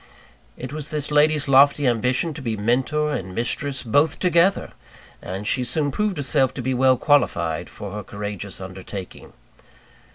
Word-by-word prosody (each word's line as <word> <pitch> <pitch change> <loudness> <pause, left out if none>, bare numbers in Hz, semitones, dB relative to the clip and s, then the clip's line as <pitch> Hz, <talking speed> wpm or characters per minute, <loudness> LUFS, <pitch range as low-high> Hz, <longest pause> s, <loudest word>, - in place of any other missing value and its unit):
It - - -7
was 150 -1 -4
this 150 -1 -3
lady's 150 0 +3
lofty 140 +1 +5
ambition 125 +6 +1
to 150 - -8
be 115 -4 -3
Mentor 135 +8 0
and 95 -8 -5
mistress, 135 +4 -1
both 145 +6 +2
together! 180 +2 +2 0.5
And 95 +3 -6
she 125 - 0
soon 145 +3 0
proved 210 +5 -1
herself 135 -2 +1
to 130 - -4
be 130 +2 0
well 130 0 +3
qualified 85 - +1
for 100 - -8
her 105 +1 -5
courageous 100 0 -6
undertaking. 95 0 -9
130 Hz, 155 wpm, -22 LUFS, 105-150 Hz, 0.5 s, lofty